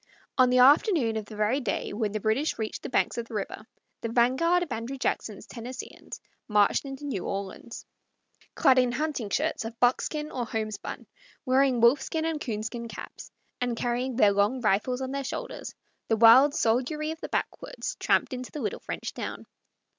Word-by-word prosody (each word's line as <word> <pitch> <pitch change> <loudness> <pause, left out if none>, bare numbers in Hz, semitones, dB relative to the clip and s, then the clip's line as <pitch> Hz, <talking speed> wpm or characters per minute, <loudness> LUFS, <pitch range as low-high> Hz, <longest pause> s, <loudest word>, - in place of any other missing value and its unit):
On 255 -1 +5
the 250 - +3
afternoon 270 - +5
of 215 -1 -3
the 215 - -10
very 215 +6 +1
day 220 -6 -3
when 210 -1 -1
the 215 - -2
British 220 +9 0
reached 220 -1 -4
the - - -6
banks 245 - +1
of 230 - -5
the 225 - -8
river 215 +1 -5 0.3
the 230 - -3
vanguard 260 +10 +3
of 325 - -8
Andrew 240 +4 -4
Jackson's - - -2
Tennesseeans 245 +1 -8 0.3
marched 210 +4 +3
into 270 +1 -7
New 250 -11 -3
Orleans. 195 +4 -6 0.7
Clad 265 -5 +5
in 250 -1 +2
hunting 295 -7 -2
shirts - - 0
of 225 +1 -7
buckskin 300 +5 +1
or 245 -3 -3
homespun, 215 -2 -4 0.4
wearing 260 -2 +3
wolfskin 270 +6 +3
and 320 -2 -2
coonskin 230 +1 -4
caps, - - -9 0.3
and 245 -2 -1
carrying 245 +2 -1
their 210 -4 +5
long 205 +6 +2
rifles 230 +4 +1
on 260 0 -3
their 275 0 -2
shoulders, - - -6 0.3
the 225 - +2
wild 255 +6 +7
soldiery 285 +6 0
of 320 - -8
the - - -5
backwoods - - -3
tramped - - +2
into 255 0 -6
the 300 - -6
little - - -2
French - - -5
town. - - -6
245 Hz, 175 wpm, -27 LUFS, 225-275 Hz, 0.7 s, wild